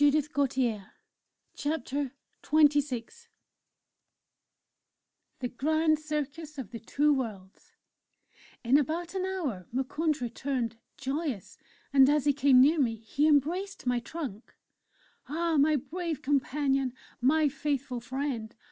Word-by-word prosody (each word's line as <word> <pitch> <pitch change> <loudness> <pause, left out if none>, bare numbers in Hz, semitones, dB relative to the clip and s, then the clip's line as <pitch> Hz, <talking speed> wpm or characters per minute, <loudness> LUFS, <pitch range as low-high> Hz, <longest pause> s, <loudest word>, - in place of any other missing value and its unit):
CHAPTER 275 -7 +2 1.5
XXVI 290 -6 +2 2.3
THE 255 - -1
GRAND 310 +5 +1
CIRCUS 300 0 -4
OF 240 -7 -6
THE 230 - -6
TWO 295 +6 +2
WORLDS 210 -8 -5 0.9
In 255 +5 +5
about 330 +5 -2
an 375 -1 -1
hour 285 - -3
Moukounj 290 +5 0
returned, 240 -1 -2 0.2
joyous, 270 - -3 0.3
and 270 -1 +7
as 295 -1 +2
he 290 - +4
came 275 -2 +5
near 300 +5 +5
me 235 -5 +2
he 230 +7 0
embraced 335 +6 +1
my 245 -1 +2
trunk. 245 -4 -7 0.7
"Ah! 330 +1 0
my 300 +2 +4
brave 330 +2 -4
companion! 275 -1 +1 0.3
My 300 +4 +4
faithful 280 -3 -2
friend! 240 -2 -4
280 Hz, 105 wpm, -29 LUFS, 250-305 Hz, 2.3 s, and